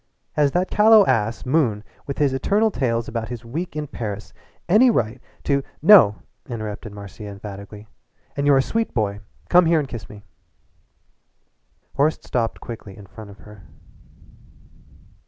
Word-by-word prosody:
Has 145 -1 +2
that 180 +1 0
callow 215 -1 +6
ass, 115 -3 0
Moon, 125 -7 +1 0.2
with 140 - -4
his 140 -3 +2
eternal 210 +11 +1
tales 115 - -1
about 115 -2 -4
his 120 -2 -7
week 155 +8 -5
in 150 0 -3
Paris, 105 -6 -6 0.3
any 220 +8 +5
right 120 - -1 0.2
to 140 -1 +1
" - - -36
"No," 105 - +7 0.3
interrupted 110 -2 -6
Marcia 100 +1 -10
emphatically. 100 +1 -9 0.5
"And 140 0 -1
you're 140 -1 +6
a 135 - +3
sweet 225 0 -2
boy. 105 -3 -1 0.3
Come 180 -1 +5
here 165 0 +4
and 150 -3 -1
kiss 115 -6 -8
me." 105 -1 -12 1.7
Horace 150 +3 +2
stopped 115 -2 -2
quickly 105 -4 -9
in 100 - -12
front 105 +2 -12
of 100 - -13
her. 105 -1 -15
120 Hz, 155 wpm, -22 LUFS, 105-150 Hz, 1.7 s, No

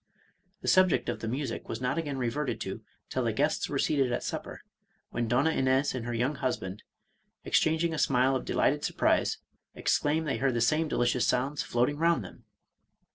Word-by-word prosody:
The - - -7
subject 185 -1 +4
of - - -3
the 115 - -5
music 130 +1 -4
was 110 - -3
not 125 +6 -1
again 145 -4 -3
reverted 125 -1 -2
to 95 +3 -5 0.3
till 130 - -2
the 115 - +1
guests 145 +8 0
were 145 - -1
seated 135 -3 +1
at - - -1
supper, - - -5 0.5
when 120 0 -1
Donna 130 +7 +2
Ines 130 0 +2
and 120 -2 -4
her 120 - -2
young 125 +5 0
husband, 115 -8 -3 0.6
ex - - +4
changing 160 +1 +1
a 155 - -2
smile 130 0 +3
of 130 - -2
delighted - - +1
surprise, - - +1 0.4
exclaimed 155 +2 +1
they 140 - 0
heard 130 -2 +1
the - - +1
same 155 +7 +2
delicious 120 -3 +1
sounds 135 +3 0
floating 125 +5 0
round 165 -6 +2
them. 90 - -12
130 Hz, 185 wpm, -29 LUFS, 120-150 Hz, 0.6 s, subject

